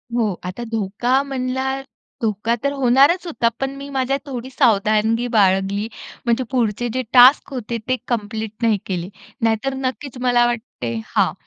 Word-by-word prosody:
हो, 220 -4 +1
आता 185 +6 -5
धोका 225 +5 +1
म्हणला 265 0 -2 0.4
धोका 225 +1 0
तर 280 - +1
होणारच 275 +7 +4
होता. 235 -8 0
पण 270 0 -2
मी 280 +1 -8
माझ्या 270 0 0
थोडी 260 -2 -6
सावधानगी 225 -1 +2
बाळगली. 200 -1 +2 0.4
म्हणजे 235 +2 +2
पुढचे 240 -2 0
जे 255 - 0
टास्क 260 +3 +7
होते 235 -2 -3
ते 255 - +3
कंप्लीट 220 -2 -3
नाही 225 -2 +3
केले. 180 -2 -3 0.3
नाहीतर 225 +4 +1
नक्कीच 265 0 -4
मला 245 -1 +4
वाटते 220 - -3 0.2
हां. - - +3
240 Hz, 145 wpm, -20 LUFS, 215-265 Hz, 0.4 s, टास्क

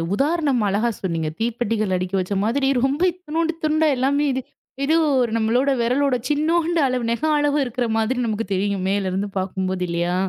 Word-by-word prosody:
உதாரணம் 280 -2 +1
அழகா 215 +5 +1
சொன்னீங்க. 165 -4 -1
தீப்பெட்டிகள் 225 -3 -1
அடுக்கி 185 +1 -2
வச்ச 185 +2 -3
மாதிரி 270 +5 +1 0.2
ரொம்ப 275 +3 0
இத்துணுன்டு 330 -1 -2
துண்ட 310 +1 +2
எல்லாமே 280 +3 +1
இது 260 0 -2 0.4
இது 310 +3 +2 0.3
ஒரு 240 -2 +1
நம்மளோட 240 +5 +2
விரலோட 255 +3 +2
சின்நோண்டு 325 +3 +1
அளவு, 250 -2 -1
நகம் 300 +6 +1
அளவு 290 0 +1
இருக்கிற 245 -1 -2
மாதிரி 225 +3 0
நமக்குத் 215 -2 -3
தெரியும். 195 0 -1
மேலருந்து 195 0 -1
பாக்கும் 190 0 -2
போது 185 -1 -3
இல்லையா? 170 +1 -1
240 Hz, 165 wpm, -22 LUFS, 200-290 Hz, 0.4 s, துண்ட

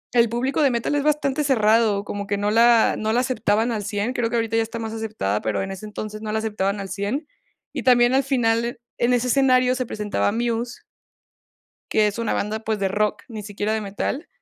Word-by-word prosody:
el 235 -1 +5
público 255 +6 -1
de 285 - +5
metal 235 +2 -1
es 290 - +1
bastante 295 -1 +1
cerrado, 220 -5 +3
como 205 0 -5
que 205 0 -1
no 205 +1 0
la 230 0 +5
no 220 0 0
la 245 - +3
aceptaban 235 -2 0
al 215 -3 -2
100, 205 +4 -2
creo 235 -3 0
que 240 - -2
ahorita 225 -1 0
ya 225 - +3
está 225 +1 -4
más 225 -1 -5
aceptada, 220 - -2
pero 110 - -1
en 195 - -5
ese 195 +3 -7
entonces 215 0 -6
no 215 -1 -4
la 220 - 0
aceptaban 205 -2 -1
al 195 - -6
100. 205 - -3 0.5
Y - - -3
también 245 -1 +4
al 270 - +4
final 235 -3 0 0.2
en 240 +1 +3
ese 245 0 +1
escenario 255 -1 +4
se 255 -2 -3
presentaba 210 -2 -1
Muse 235 +1 -2 1.1
que 215 -1 +4
es 210 +2 -2
una 230 -1 -1
banda, 215 +2 -2
pues 220 -1 -1
de 195 -1 0
rock, 210 +2 -1
ni 220 -3 -7
siquiera 205 +1 -3
de 220 - 0
metal, 210 - -4
225 Hz, 220 wpm, -23 LUFS, 210-245 Hz, 1.1 s, el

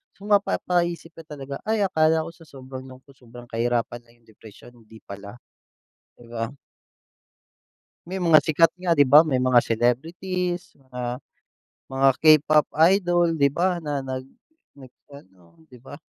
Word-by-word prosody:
So, 195 - -18
mapapaisip 175 -5 0
ka 165 - -11
talaga, 140 -2 -8
"Ay, 220 -2 +1
akala 160 -3 +2
ko 165 - -9
sa 165 -1 -19
sobrang 130 -1 -11
lungkot, 130 +2 -16
sobrang 120 0 -14
kahirapan 120 +1 -2
lang 120 0 -27
yung - - -33
depresyon, 110 +2 -16
hindi 110 -1 -17
pala." 100 +2 -10 0.8
di 120 - -16
ba? 115 -1 -3 1.6
May 190 +2 -5
mga 165 -2 +6
sikat 165 +1 +2
nga, 175 -2 +1
di 145 - +5
ba? 140 +3 +7
May 140 - 0
mga 125 -1 +3
celebrities, 170 +11 -2
mga 125 -2 -6 0.7
mga 135 +1 +2 0.2
K-pop 155 -1 +5 0.3
idol, 175 -3 +1
di 140 -3 +2
ba 175 +1 -1
na 145 -2 -3
nag 130 -1 -5 0.6
nag-ano, 95 - -18
di 125 - -17
ba? 145 +2 -11
140 Hz, 145 wpm, -23 LUFS, 120-165 Hz, 1.6 s, ba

